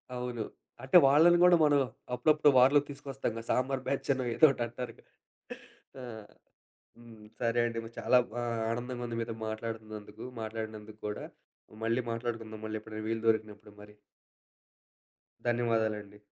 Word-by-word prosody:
అవును. 125 Hz, -2 st, -3 dB, 0.4 s
అంటే 130 Hz, +7 st, +6 dB
వాళ్లని 165 Hz, +5 st, +6 dB
కూడా 180 Hz, 0 st, +7 dB
మనం 145 Hz, -1 st, +5 dB, 0.3 s
అప్పుడప్పుడు 150 Hz, +3 st, +4 dB
వార్‌లోకి 140 Hz, +3 st, +5 dB
తీసుకొస్తాం 135 Hz, -3 st, -4 dB
కదా! 115 Hz, -, -6 dB
సాంబార్ 130 Hz, +1 st, 0 dB
బ్యాచ్ 140 Hz, -, -2 dB
అనో, 130 Hz, -1 st, -3 dB
ఏదోటి 140 Hz, -6 st, +5 dB
అంటారు 120 Hz, +1 st, -6 dB
కదా! -, -, -24 dB, 0.9 s
ఆ! -, -, -7 dB, 1.0 s
హ్మ్. 115 Hz, -2 st, -14 dB
సరే 120 Hz, 0 st, +1 dB
అండి 115 Hz, -1 st, -3 dB
మరి 115 Hz, +1 st, -11 dB
చాలా 125 Hz, -, +4 dB, 0.3 s
ఆహ్, 115 Hz, -1 st, -2 dB
ఆనందంగా 120 Hz, +1 st, -4 dB
ఉంది. 115 Hz, -1 st, -4 dB
మీతో 115 Hz, 0 st, -3 dB
మాట్లాడుతున్నందుకు. 110 Hz, -1 st, -6 dB, 0.2 s
మాట్లాడినందుకు 110 Hz, -1 st, -6 dB
కూడా. 105 Hz, -, -5 dB, 0.6 s
మళ్లీ 115 Hz, +2 st, +1 dB
మాట్లాడుకుందాం. 115 Hz, -2 st, -5 dB
మళ్లీ 110 Hz, 0 st, -3 dB
ఎప్పుడైనా 110 Hz, 0 st, -7 dB
వీలు 115 Hz, 0 st, -2 dB
దొరికినప్పుడు 105 Hz, -2 st, -1 dB
మరి. 105 Hz, 0 st, -14 dB, 1.5 s
ధన్యవాదాలండి. 110 Hz, -4 st, 0 dB
115 Hz, 130 wpm, -31 LUFS, 110-130 Hz, 1.5 s, కూడా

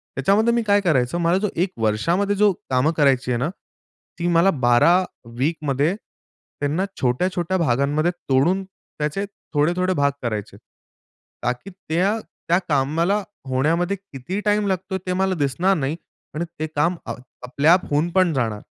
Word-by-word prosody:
त्याच्यामध्ये 205 Hz, -, +3 dB
मी 235 Hz, -, +2 dB
काय 205 Hz, 0 st, +4 dB
करायचो, 145 Hz, -4 st, +1 dB
मला 170 Hz, +2 st, +2 dB
जो 210 Hz, 0 st, 0 dB
1 185 Hz, +2 st, 0 dB
वर्षामध्ये 170 Hz, -, +1 dB
जो 210 Hz, 0 st, +4 dB, 0.2 s
कामं 130 Hz, +4 st, +2 dB
करायची 135 Hz, -3 st, +3 dB
आहे 120 Hz, -, +1 dB
ना, 140 Hz, +6 st, 0 dB, 0.7 s
ती 170 Hz, -, 0 dB
मला 170 Hz, +2 st, +4 dB
12 120 Hz, +1 st, +3 dB
वीकमध्ये 150 Hz, +2 st, 0 dB, 0.6 s
त्यांना 150 Hz, +7 st, 0 dB, 0.2 s
छोट्या-छोट्या 175 Hz, +8 st, 0 dB
भागांमध्ये 145 Hz, +2 st, +1 dB
तोडून 175 Hz, +4 st, +1 dB
त्याचे 190 Hz, -1 st, -5 dB, 0.3 s
थोडे-थोडे 175 Hz, +5 st, +2 dB
भाग 140 Hz, -3 st, +2 dB
करायचे 110 Hz, -4 st, -4 dB
आहेत. -, -, -15 dB, 0.8 s
ताकी 125 Hz, +9 st, -2 dB
त्या, 185 Hz, +3 st, 0 dB, 0.3 s
त्या 175 Hz, -, +4 dB
कामाला 165 Hz, +8 st, +1 dB, 0.3 s
होण्यामध्ये 165 Hz, +9 st, +1 dB
किती 185 Hz, 0 st, -6 dB
टाईम 210 Hz, 0 st, +2 dB
लागतोय 190 Hz, 0 st, -2 dB
ते 180 Hz, -, 0 dB
मला 190 Hz, 0 st, +1 dB
दिसणार 170 Hz, +7 st, +1 dB
नाही 145 Hz, +1 st, -1 dB, 0.4 s
आणि 170 Hz, -, -1 dB
ते 155 Hz, -, -1 dB
काम 165 Hz, +5 st, +2 dB, 0.5 s
आपल्या 140 Hz, +6 st, +4 dB
आप 185 Hz, -, +2 dB
होऊन 150 Hz, +4 st, +2 dB
पण 185 Hz, -2 st, +3 dB
जाणार. 115 Hz, -6 st, -1 dB
165 Hz, 145 wpm, -22 LUFS, 135-185 Hz, 0.8 s, काय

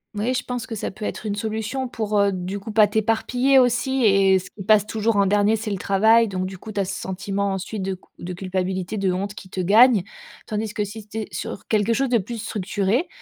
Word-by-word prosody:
Moui, 230 Hz, +5 st, 0 dB
je 250 Hz, -, -1 dB
pense 245 Hz, -2 st, -4 dB
que 225 Hz, -, -5 dB
ça 210 Hz, -, -4 dB
peut 210 Hz, +2 st, -7 dB
être -, -, -5 dB
une 210 Hz, -, -1 dB
solution 220 Hz, +5 st, -3 dB
pour, 215 Hz, -3 st, -1 dB
heu, 200 Hz, 0 st, +3 dB
du 185 Hz, +2 st, -4 dB
coup 220 Hz, +3 st, -7 dB
pas 215 Hz, 0 st, +6 dB
t'éparpiller 235 Hz, +5 st, +2 dB
aussi 255 Hz, +1 st, +2 dB
et 195 Hz, -2 st, +5 dB
ce 185 Hz, -, -7 dB
qui 205 Hz, -, -11 dB
passe 210 Hz, 0 st, +4 dB
toujours 220 Hz, +1 st, 0 dB
en 200 Hz, -1 st, +4 dB
dernier, 205 Hz, +2 st, +3 dB
c'est 215 Hz, -1 st, -4 dB
le 200 Hz, -, -1 dB
travail. 220 Hz, +4 st, +4 dB
Donc 185 Hz, -2 st, -3 dB
du 190 Hz, 0 st, -7 dB
coup, 220 Hz, -, -9 dB
tu 205 Hz, -, -3 dB
as 195 Hz, -, +1 dB
ce 190 Hz, -, -4 dB
sentiment 195 Hz, +1 st, -2 dB
ensuite 195 Hz, +2 st, -4 dB
de 190 Hz, 0 st, -2 dB
cu 185 Hz, -, -21 dB, 0.2 s
de 180 Hz, +1 st, -4 dB
culpabilité, 185 Hz, +1 st, -3 dB
de 195 Hz, -2 st, +1 dB
honte 195 Hz, +3 st, -3 dB
qui 190 Hz, -, -11 dB
te 185 Hz, -, -6 dB
gagne. 210 Hz, +3 st, +5 dB, 0.4 s
Tandis 215 Hz, 0 st, -3 dB
que 210 Hz, -, 0 dB
si 205 Hz, +1 st, -8 dB
tu 210 Hz, +1 st, -8 dB
es 220 Hz, -, -3 dB
sur -, -, -6 dB
quelque 215 Hz, +1 st, +2 dB
chose 270 Hz, +3 st, 0 dB
de 240 Hz, -2 st, +3 dB
plus 230 Hz, +4 st, -6 dB
structuré, 205 Hz, -, -1 dB
205 Hz, 245 wpm, -23 LUFS, 195-225 Hz, 0.4 s, pas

